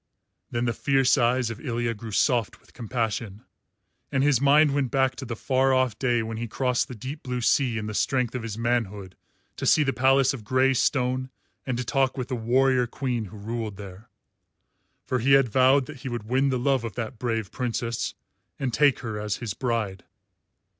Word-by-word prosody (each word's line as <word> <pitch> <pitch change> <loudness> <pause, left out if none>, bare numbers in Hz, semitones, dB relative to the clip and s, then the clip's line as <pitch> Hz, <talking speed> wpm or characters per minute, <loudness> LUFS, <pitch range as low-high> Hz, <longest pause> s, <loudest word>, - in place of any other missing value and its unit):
Then 120 +1 -1
the 120 - 0
fierce 135 -1 +3
eyes 125 -2 +1
of 115 - -8
Ilya 120 -4 -2
grew 115 +1 -9
soft 120 0 +1
with - - -25
compassion, 110 -3 -3 0.7
and 135 -1 +1
his 140 -4 +3
mind 145 +1 +5
went 140 -3 0
back 130 -1 +1
to 130 - -6
the 120 -1 -4
far 130 +2 +2
off 130 -4 +1
day 120 -3 +1
when 110 0 -5
he 120 +1 -4
crossed 125 +2 0
the 125 - -8
deep 130 +7 -7
blue 125 -1 -3
sea 120 0 +2
in 105 - -3
the 105 - -5
strength 125 +2 0
of 125 - -3
his 110 -2 -5
manhood 105 -5 -2 0.4
to - - -4
see 155 - +5
the 135 -2 0
palace 135 +2 +3
of 125 -5 -7
grey 130 +4 +2
stone 130 0 0 0.4
and 125 -2 -1
to 125 - -2
talk 130 +3 0
with 130 0 -4
the 130 - -1
warrior 125 +2 +2
queen 120 -3 -3
who 105 +2 -11
ruled 110 -1 -5
there; 100 +1 -11 1.0
for 130 - -1
he 135 +4 +3
had 135 -3 +5
vowed 130 +3 +4
that 155 0 -10
he 130 - -6
would 120 -3 -4
win 130 +3 +2
the 130 - 0
love 130 0 +1
of 115 - -5
that 115 -1 -5
brave 115 -4 -2
Princess 120 -1 -3 0.4
and 130 -3 -2
take 145 +1 +3
her 110 -4 -4
as 105 -1 -2
his 115 -5 -5
bride. 110 -7 -2
125 Hz, 200 wpm, -25 LUFS, 115-130 Hz, 1.0 s, mind